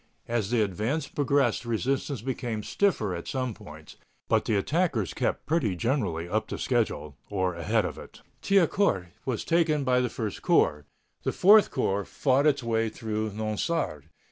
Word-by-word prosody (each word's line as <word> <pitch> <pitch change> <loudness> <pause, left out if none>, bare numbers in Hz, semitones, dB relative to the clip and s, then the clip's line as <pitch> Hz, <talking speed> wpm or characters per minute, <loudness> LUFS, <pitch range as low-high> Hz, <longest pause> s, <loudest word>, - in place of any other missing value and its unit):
As 115 -4 -1
the 120 -3 +3
advance 110 - -2
progressed 140 -5 +1
resistance 125 +1 -2
became 120 -4 -3
stiffer 135 - 0
at 85 -1 -6
some 130 -3 -2
points, 75 -4 -13 0.3
but - - +2
the 110 - +1
attackers 120 - 0
kept - - -2
pretty 140 - +1
generally 90 - -1
up 105 +4 -1
to - - -5
schedule, 110 - -1
or 95 -3 0
ahead 100 +6 0
of 80 -5 -5
it. - - -13 0.2
Thiaucourt 185 - +2 0.2
was 125 -4 -2
taken 165 -3 +2
by 125 -1 +3
the 125 -1 0
First 110 -4 -4
Corps. 75 0 +2 0.4
The - - -1
Fourth 210 +3 +6
Corps 100 +1 0
fought 135 +7 +1
its 140 -3 +2
way 115 -1 0
through 110 -1 -3
Nonsard. 110 - -2
115 Hz, 160 wpm, -27 LUFS, 100-140 Hz, 0.4 s, Fourth